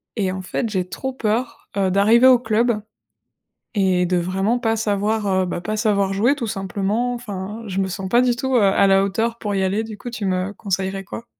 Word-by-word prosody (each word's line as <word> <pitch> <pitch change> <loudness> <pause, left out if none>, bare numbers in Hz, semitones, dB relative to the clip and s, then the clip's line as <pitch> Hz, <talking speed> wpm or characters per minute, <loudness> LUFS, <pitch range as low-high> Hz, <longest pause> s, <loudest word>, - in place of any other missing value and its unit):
Et 195 -5 0
en 190 0 -5
fait, 225 +5 -3
j'ai 185 -3 -2
trop 265 - -4
peur, 230 0 -2
heu, 190 -2 +2
d'arriver 220 +6 +5
au 250 -2 +7
club 225 -1 +1 0.9
et 185 -3 +2
de 180 0 +1
vraiment 195 +6 0
pas 225 -2 +1
savoir, 210 0 0 0.2
heu, - - -1
bah, 175 - -4
pas 215 +4 -3
savoir 200 -3 +1
jouer 235 +8 +3
tout 240 -5 -4
simplement. 205 +4 -1
Enfin, 210 -2 -6
je 190 0 -3
me 190 - +1
sens 190 0 -5
pas 240 +3 +4
du 245 -1 +2
tout, 265 +1 -1
heu, - - +4
à 195 0 +4
la 195 0 +4
hauteur 225 +4 -1
pour 205 -3 -3
y 195 - +1
aller. 200 +4 0
Du 220 -1 -8
coup, 245 - -6
tu 225 -3 -5
me 185 +1 -1
conseillerais 195 -1 -3
quoi? 230 - -8
205 Hz, 220 wpm, -21 LUFS, 195-230 Hz, 0.9 s, au